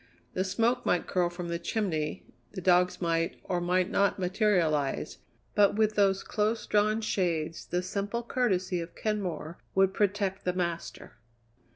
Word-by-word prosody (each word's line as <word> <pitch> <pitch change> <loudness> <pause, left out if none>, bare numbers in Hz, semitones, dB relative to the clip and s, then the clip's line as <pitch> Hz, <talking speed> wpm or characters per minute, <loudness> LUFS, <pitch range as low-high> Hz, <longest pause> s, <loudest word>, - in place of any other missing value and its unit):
The 185 - 0
smoke 225 +6 +1
might 180 - +1
curl 180 -2 +1
from 175 0 -6
the 170 0 -2
chimney, 170 -6 -2 0.3
the 195 - -5
dogs 180 0 +3
might, 165 0 0
or 180 -2 -1
might 180 +2 +1
not, 200 0 +2
materialize, 180 -7 +1 0.3
but 205 -1 +4
with 215 0 +2
those 195 -2 +2
close 215 +2 -1
drawn 215 +1 +2
shades 170 -6 -1
the 180 +1 -1
simple 205 +5 -3
courtesy 190 -8 0
of 165 0 -8
Kenmore 180 -7 -3 0.2
would 190 0 +4
protect 200 -1 0
the 180 - 0
master. 170 -2 -4
185 Hz, 150 wpm, -29 LUFS, 175-205 Hz, 0.3 s, but